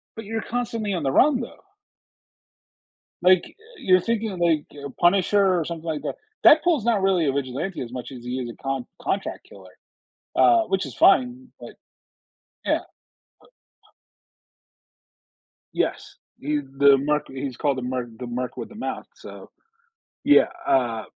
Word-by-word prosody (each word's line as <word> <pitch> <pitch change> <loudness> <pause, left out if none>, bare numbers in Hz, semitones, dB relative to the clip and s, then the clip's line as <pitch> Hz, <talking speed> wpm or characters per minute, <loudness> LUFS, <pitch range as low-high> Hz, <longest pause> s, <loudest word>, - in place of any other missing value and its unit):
But 225 -2 -8
you're 225 0 -3
constantly 230 -3 -3
on 175 -4 -2
the 135 - +1
run, 260 - +4
though. 235 - -9 1.6
Like, 185 0 +5
uh, 450 +3 -19
you're 185 -1 +4
thinking 225 +1 -1
of, 180 - -7
like, 160 -3 +2 0.2
uh, - - -4
Punisher 190 +1 +3
or 160 - -2
something 165 0 -7
like 155 -2 -3
that. - - -4 0.3
Deadpool's 310 -5 +5
not 230 -4 +2
really 185 -5 +2
a 135 - +2
vigilante 140 +7 -3
as 120 -1 -6
much 125 0 -6
as 125 -2 -10
he 125 +1 -3
is 120 - -5
a - - -11
con 135 -2 -3 0.2
contract 195 - -3
killer, - - -15 0.7
uh, 350 -1 +5
which 195 - -1
is - - -9
fine, 260 -7 +3
but - - -10 0.9
Yeah, - - +1 0.6
but - - -24 2.2
Yes, - - -2 0.2
he 150 +2 -1 0.2
the 140 0 +6
Merc 150 +2 -1
he 135 +1 -5
is 130 -3 -7
called 140 -3 0
the - - -4
Merc 125 -1 -3
the 125 - -6
Merc 125 +1 -4
with - - -7
a - - -13
Mouth, 225 - -5
so - - -12 0.7
Yeah, - - +6 0.2
uh 120 -4 +1
170 Hz, 160 wpm, -24 LUFS, 135-225 Hz, 2.2 s, the